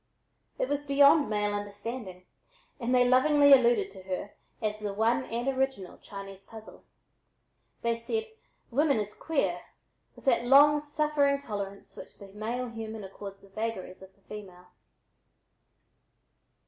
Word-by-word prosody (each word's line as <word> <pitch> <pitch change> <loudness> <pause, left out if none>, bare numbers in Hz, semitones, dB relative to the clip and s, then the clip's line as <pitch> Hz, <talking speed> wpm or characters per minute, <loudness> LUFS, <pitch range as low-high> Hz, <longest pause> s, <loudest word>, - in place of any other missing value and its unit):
It - - 0
was 290 0 -2
beyond 280 +1 +5
male 210 -1 0
understanding 205 -2 -6 0.5
and 240 -1 -2
they 250 -1 +4
lovingly 285 +3 +6
alluded 235 -7 +4
to 190 -1 -12
her 190 +2 -5 0.3
as 215 -1 -2
the 205 -2 -4
"one 230 +5 +1
and 235 +3 -3
original 265 -8 -2
Chinese 195 -1 -10
puzzle." 220 +1 -13 1.0
They 235 0 +1
said 445 - -2 0.5
"women 280 +2 +3
is 210 0 -4
queer" 320 -3 -1 0.5
with - - -17
that 240 -3 +3
long 290 +3 +7
suffering 295 -1 +1
tolerance 200 -6 -6
which - - -12
the 200 - -12
male 230 +5 -4
human 225 -2 -7
accords 195 0 -9
the 195 - -18
vagaries 195 -3 -5
of 190 0 -14
the 200 - -32
female. 185 -4 -11
225 Hz, 135 wpm, -29 LUFS, 200-270 Hz, 1.0 s, long